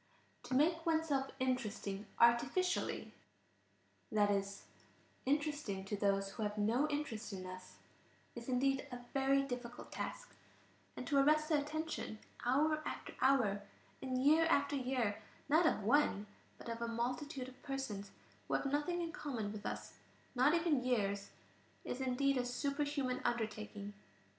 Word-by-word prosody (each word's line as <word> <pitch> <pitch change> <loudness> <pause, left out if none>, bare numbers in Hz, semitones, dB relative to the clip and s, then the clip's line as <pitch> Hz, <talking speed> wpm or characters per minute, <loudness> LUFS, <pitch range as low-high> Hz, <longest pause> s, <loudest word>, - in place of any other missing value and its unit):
"To 255 - -2
make 325 +4 +3
oneself 315 -5 +1
interesting 215 -6 -1
artificially," 245 +10 +3 1.0
that 205 -1 +4
is, 200 0 -1 0.6
interesting 290 -9 0
to 205 - -2
those 195 -1 +1
who 220 - -7
have 210 0 -1
no 230 +8 +2
interest 290 -8 -3
in 185 -1 -5
us, 185 0 -9 0.6
is 235 +1 -7
indeed 270 +2 +2
a 245 0 -6
very 275 0 +3
difficult 245 -2 -6
task; - - -5 0.6
and - - -4
to 285 -3 +3
arrest 305 +2 +4
the 300 -3 +4
attention 310 -6 -3 0.3
hour 305 +5 +3
after - - -5
hour, 240 -7 +4 0.4
and 260 -1 -1
year 315 +3 +6
after 285 -3 +3
year, 250 -6 0 0.3
not 315 +3 +5
of 215 - +1
one, 225 -3 +3 0.3
but - - -11
of 230 0 -4
a 235 - 0
multitude 250 +3 -2
of 260 0 -13
persons 230 -8 -4 0.4
who - - +1
have - - 0
nothing 295 +5 0
in 330 - -3
common 260 - -3
with 210 -1 -5
us, - - -6 0.3
not 270 +5 +4
even 325 -6 +2
years, 200 -5 0 0.6
is 255 - -3
indeed 265 +1 +2
a 250 - +2
superhuman 280 +1 -1
undertaking. 215 -3 -2
255 Hz, 145 wpm, -37 LUFS, 215-290 Hz, 1.0 s, year